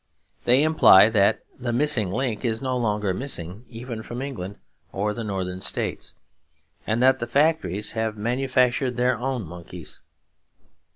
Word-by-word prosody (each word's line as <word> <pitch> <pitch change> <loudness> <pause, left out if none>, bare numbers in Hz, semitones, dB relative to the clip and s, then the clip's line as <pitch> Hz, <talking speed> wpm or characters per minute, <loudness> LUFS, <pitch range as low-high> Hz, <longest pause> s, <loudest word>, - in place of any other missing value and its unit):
They 125 +4 +5
imply 135 -10 +7
that 100 -3 +2 0.2
the 120 -1 -2
Missing 120 -5 +1
Link 120 +3 -2
is 115 -2 -1
no 130 0 -2
longer 105 -5 0
missing, 100 -3 -4
even 115 -1 -7
from 120 +2 -7
England 120 -8 -5 0.4
or 105 +2 -1
the 115 - -5
Northern 95 -3 -4
States, - - -3 0.7
and 115 +3 +1
that 130 0 +5
the 120 - -3
factories 120 - +1
have 110 -1 -2
manufactured 125 +2 +1
their 125 +1 +2
own 130 -2 -2
monkeys. 85 0 -9
115 Hz, 140 wpm, -24 LUFS, 105-130 Hz, 0.7 s, imply